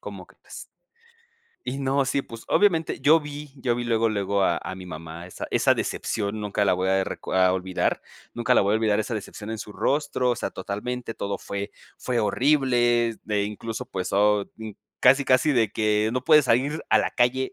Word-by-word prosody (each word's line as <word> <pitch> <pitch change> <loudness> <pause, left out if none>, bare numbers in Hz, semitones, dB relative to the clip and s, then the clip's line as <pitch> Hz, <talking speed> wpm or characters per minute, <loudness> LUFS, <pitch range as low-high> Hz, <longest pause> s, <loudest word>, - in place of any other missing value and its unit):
¿Cómo - - -9
crees? - - -13 0.9
Y 130 +2 -4
no, 135 0 +1
sí, 140 +1 0
pues 115 0 -11
obviamente 170 -6 +2
yo 160 +2 +5
vi 150 -1 -8
yo 125 -2 0
vi 120 - -3
luego 115 -1 +1
luego 100 -1 0
a 85 -3 +2
a 95 +2 -5
mi 95 - -9
mamá, 80 0 -8
esa 90 - -7
esa - - +3
decepción 105 -1 -3
nunca 105 0 -1
la 90 - +4
voy 95 +1 0
a 95 0 +2
reco - - -6
a 95 0 +4
olvidar, 95 0 -1 0.3
nunca 120 +1 +1
la - - +5
voy 100 +2 +2
a - - +4
olvidar 110 -1 +1
esa 110 +2 -3
decepción 105 0 -7
en 110 - -3
su 105 - -8
rostro, 140 -1 0
o 120 - 0
sea, 110 - -3
totalmente 115 +6 -5
todo 100 0 -4
fue 100 +1 -5 0.3
fue 125 -2 -1
horrible, 120 -1 +2
eh, 105 -1 +1
incluso 115 +4 -5
pues 95 -7 -4
oh, 105 0 +3 0.6
casi 135 +2 +5
casi 130 +4 +3
de 115 -4 +2
que 110 0 +1
no 130 0 -1
puedes 155 -2 +6
salir 135 +7 +1
a - - +6
la - - 0
calle. 130 +2 +1
115 Hz, 200 wpm, -25 LUFS, 100-130 Hz, 0.9 s, puedes